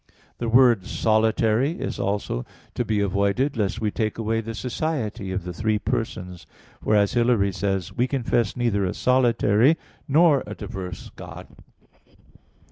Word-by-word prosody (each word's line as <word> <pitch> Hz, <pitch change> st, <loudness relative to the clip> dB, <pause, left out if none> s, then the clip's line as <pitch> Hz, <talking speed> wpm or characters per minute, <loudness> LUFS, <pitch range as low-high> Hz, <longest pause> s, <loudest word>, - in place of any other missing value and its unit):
The 115 Hz, -, -2 dB
word 120 Hz, -5 st, +5 dB
"solitary" 110 Hz, +5 st, +2 dB
is 180 Hz, -, -5 dB
also 100 Hz, -11 st, -2 dB, 0.3 s
to -, -, -1 dB
be 105 Hz, -2 st, 0 dB
avoided, 100 Hz, +8 st, +1 dB
lest 105 Hz, -1 st, -1 dB
we 110 Hz, -2 st, -1 dB
take 110 Hz, 0 st, -2 dB
away 115 Hz, 0 st, -1 dB
the 115 Hz, 0 st, -6 dB
society 120 Hz, -6 st, -3 dB
of 95 Hz, -1 st, -3 dB
the 90 Hz, 0 st, -6 dB
three 110 Hz, +4 st, 0 dB
persons; 100 Hz, -6 st, -4 dB, 0.4 s
for, 105 Hz, -, +2 dB
as 100 Hz, -1 st, +3 dB
Hilary 120 Hz, -5 st, +2 dB
says -, -, -9 dB
(De 100 Hz, -, 0 dB, 0.2 s
Trin. -, -, -15 dB
iv), -, -, -22 dB
"We 125 Hz, -, +3 dB
confess 120 Hz, -5 st, 0 dB
neither 115 Hz, -5 st, +1 dB
a 90 Hz, -, -2 dB
solitary 125 Hz, +2 st, +3 dB, 0.3 s
nor 150 Hz, -1 st, +4 dB
a 105 Hz, -, -6 dB
diverse 90 Hz, -1 st, -7 dB
God." -, -, -10 dB
110 Hz, 160 wpm, -24 LUFS, 100-125 Hz, 0.4 s, word